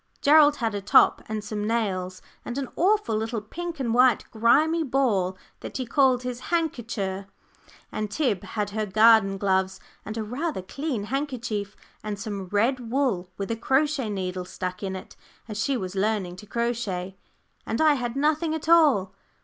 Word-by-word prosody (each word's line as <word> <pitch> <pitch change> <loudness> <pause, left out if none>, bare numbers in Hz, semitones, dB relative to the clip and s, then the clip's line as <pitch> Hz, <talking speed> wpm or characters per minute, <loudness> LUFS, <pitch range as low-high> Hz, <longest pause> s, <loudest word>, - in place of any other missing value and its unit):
Gerald 295 0 +6
had 225 -5 -2
a 205 - -3
top 200 - +5
and 215 -1 -3
some 210 0 -3
nails, 185 -5 -2 0.2
and 245 - -5
an 275 -2 -3
awful 390 - +2
little 220 +1 -2
pink 330 +9 -7
and 235 -4 -1
white 250 0 +4
grimy 300 +9 +3
ball 225 -10 +1 0.2
that - - -6
he 255 - -3
called 255 0 +3
his 250 -1 -4
"handkercher"; 230 - -2 0.6
and 215 -1 -3
Tib 215 - 0
had 210 -2 -4
her 215 0 -2
garden 215 -1 +5
gloves, 190 -1 0 0.2
and 215 +2 -6
a 220 - -2
rather 250 - -3
clean 270 +1 -3
handkerchief, 235 -5 -3 0.3
and 210 -1 -4
some 200 -3 -5
red 230 +5 0
wool 240 -10 0
with 200 +2 -4
a - - 0
crochet 270 +1 +1
needle 185 -2 -3
stuck 180 0 -5
in 190 -2 -3
it, 185 - -9 0.3
as 215 -2 -5
she 275 -2 0
was 185 -4 -5
learning 195 -3 -1
to 210 - -12
crochet; 215 -6 -2 0.5
and 225 - -2
I 310 -1 +5
had 245 -3 -3
nothing 310 +3 +1
at 315 - -6
all. 285 - +4
225 Hz, 170 wpm, -25 LUFS, 200-270 Hz, 0.6 s, Gerald